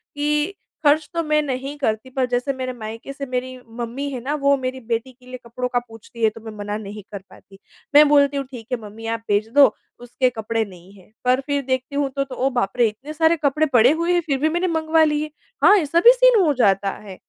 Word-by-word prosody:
कि 300 +5 0 0.3
ख़र्च 295 0 +3
तो 335 - 0
मैं 305 -1 +2
नहीं 270 +1 -4
करती 220 -2 -2
पर 260 0 0
जैसे 250 +3 -1
मेरे 255 -1 -4
मायके 225 +3 -8
से 275 0 -6
मेरी 255 0 -3 0.2
मम्मी 240 +4 -4
है 260 - -5
ना 285 +3 -2
वो 280 0 +4
मेरी 260 0 -4
बेटी 230 +3 -2
के 250 0 -24
लिए 255 0 -8
कपड़ों 245 +2 -4
का 245 -1 +1
पूछती 225 +1 -10
है 220 - +5
तो 220 +1 -13
मैं 220 0 -8
मना 205 0 -4
नहीं 210 -1 -8
कर 200 -2 -6
पाती। 195 +1 -17 0.4
मैं 300 +1 +8
बोलती 285 -1 +4
हूँ 275 - -2
ठीक 235 -4 -9
है 250 - 0
मम्मी 215 +2 -10
आप 225 - -8
भेज 205 +1 +1
दो 285 -1 +9 0.3
उसके 245 +1 0
कपड़े 225 -1 -2
नहीं 185 0 -15
हैं 185 - -21
पर 255 +1 +3
फ़िर 285 0 -2
देखती 260 +1 -2
हूँ 285 -1 0
तो 275 +1 -2
तो, 265 -2 -9
ओह 265 +2 +1
बाप 245 -6 -1
रे, 235 -2 +4
इतने 255 +8 -8
सारे 320 +1 +3
कपड़े 300 +3 +2
पड़े 245 +2 +6
हुए 335 +3 0
हैं 350 - +2
फ़िर 280 -4 -1
भी 310 +2 +2
मैंने 345 +3 0
मंगवा 320 -1 +2
लिए। 305 0 0 0.3
हाँ, 410 - +8
ऐसा 330 0 +1
भी 475 +6 +8
सीन - - +5
हो 300 - +3
जाता 195 0 +3 0.2
है। 190 - -8
260 Hz, 245 wpm, -21 LUFS, 230-295 Hz, 0.4 s, दो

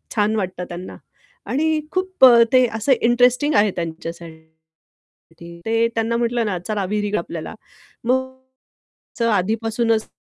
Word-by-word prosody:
छान 210 0 +1
वाटतं 185 -3 -3
त्यांना. 175 +1 -8 0.5
आणि 315 +3 0
खूप 370 -5 +3
अ, 235 -2 +8
ते 255 -1 +6
असं 220 +5 0
इंटरेस्टिंग 245 +5 +3
आहे 205 0 +4
त्यांच्या 165 -1 -4
त्यांच्यासाठी 160 +1 -17
ते 225 +1 +2
त्यांना 225 +1 0
म्हटलं 235 0 0
ना, 195 -4 -2
चला 210 -3 -2
विहिर 210 0 -1
आपल्याला. 170 +2 -6 0.5
मग 260 +2 -1 1.0
आधीपासूनच 225 +3 0
220 Hz, 125 wpm, -20 LUFS, 180-240 Hz, 1.0 s, अ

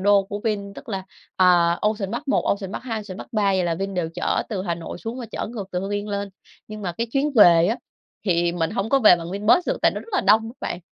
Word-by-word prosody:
đô 200 +1 +4
của 205 +1 -6
Vin 200 -2 -2
tức 275 - -12
là, 195 -3 -3 0.3
à, 175 -2 +4
Ocean 210 -2 -1
Park 290 - -5
1, - - +3
Ocean 200 -1 -1
Park - - -5
2, 225 -3 -3
Ocean 195 -2 -9
Park - - -10
3 215 -2 +1
vậy 185 -2 +1
là 170 -1 0
Vin 195 +2 -4
đều 175 -3 -1
chở - - 0
từ 195 -5 -3
Hà 170 -3 -1
Nội 170 +1 -8
xuống 230 +5 -6
và 240 - -6
chở - - -4
ngược 215 -3 -6
từ 180 - -1
Hưng 195 +1 -4
Yên 205 +1 -3
lên. 200 0 -3 0.4
Nhưng 215 0 -8
mà 180 -3 -2
cái 230 +6 -3
chuyến 285 +2 +1
về 170 -5 +7
á 225 +6 0 0.5
thì 170 -2 +1
mình 165 0 -1
hông 210 -1 -2
có 275 +3 +4
về 210 -7 +7
bằng 170 0 -7
Vinbus 210 - +2
được - - 0
tại - - +5
nó - - -4
rất - - -15
là 380 - +2
đông 220 +3 +4
đó - - -9
bạn. 175 - -3
200 Hz, 285 wpm, -23 LUFS, 180-220 Hz, 0.5 s, về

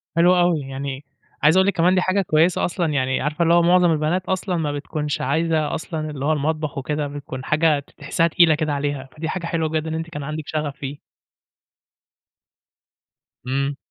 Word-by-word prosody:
حلو 175 +2 +5
اوي، 175 -2 +3
يعني 135 0 -6 0.4
عايز 155 +5 +6
أقول 190 +1 +4
لِك 200 - +2
كمان 180 +2 +3
دي 185 - +3
حاجة 185 +2 +1
كويسة 165 0 +2
أصلًا 175 0 -1
يعني 130 -1 0
عارفة 150 +4 0
اللي 170 0 +4
هو 175 - +6
معظم 175 0 +4
البنات 160 +4 0
أصلًا 185 -1 -1
ما 150 -3 -1
بتكونش 150 0 -3
عايزة 160 +2 0
أصلًا 155 -1 -4
اللي 140 -2 -5
هو 155 - +2
المطبخ 155 0 -2
وكده، 150 +2 -2
بتكون 140 -2 -7
حاجة 155 -1 +3
ت 140 - -15
تحسّها 165 - +1
تقيلة 165 -1 +4
كده 155 -1 -1
عليها، 140 -2 -3
فدي 160 +1 -3
حاجة 180 -1 -3
حلوة 165 -2 -1
جدًا 160 0 -2
إن 160 - -3
أنتِ 165 +1 -4
كان 145 -3 -6
عندك 155 +2 -4
شغف 150 -3 -3
فيه. 140 0 -6 2.5
إمم. 140 +2 -1
155 Hz, 190 wpm, -22 LUFS, 145-170 Hz, 2.5 s, عايز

